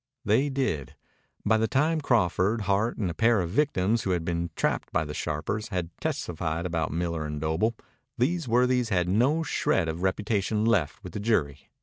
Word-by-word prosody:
They 115 +8 +3
did. 130 - -2 0.5
By 110 +1 +4
the 110 0 +1
time 155 +5 +1
Crawford, 110 - +2
Hart, 105 +4 0
and 100 - -1
a 85 - -2
pair 115 +4 +3
of 85 -2 -2
victims 115 -4 +1
who 95 - -3
had 90 -3 0
been 85 0 -1
trapped - - -1
by 80 -2 +1
the 75 - -6
sharpers 85 +9 -3
had 90 -5 -3
testified 80 0 -2
about 80 -3 -1
Miller 85 0 -2
and 75 -1 -4
Doble, 80 +9 0 0.4
these 155 +5 0
worthies 125 0 +2
had 90 -4 +1
no 130 - +2
shred 85 - +1
of 80 +2 -3
reputation 105 +2 0
left 100 -5 +1
with 90 -3 -8
the - - -3
jury. 80 -10 0
100 Hz, 185 wpm, -27 LUFS, 85-115 Hz, 0.5 s, By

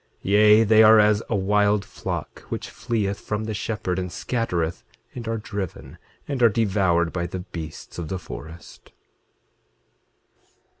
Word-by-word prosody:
8:21 95 - -1
Yea, 105 +1 +6
they 110 0 +5
are 110 0 +8
as 105 0 +4
a 115 - +1
wild 105 +1 +2
flock - - -5
which - - -5
fleeth 100 -4 -2
from 105 0 -3
the 110 0 -3
shepherd, 105 -4 -2
and 90 -1 -4
scattereth, 85 -4 -2 0.3
and 120 -2 -7
are 115 0 -1
driven, 100 -4 -6 0.3
and 140 -3 -3
are 120 - +7
devoured 95 -6 +1
by 85 -1 -2
the 90 +1 -5
beasts 85 -3 -8
of 85 - -4
the 95 - -3
forest. 80 -1 -11
105 Hz, 150 wpm, -24 LUFS, 90-110 Hz, 0.3 s, are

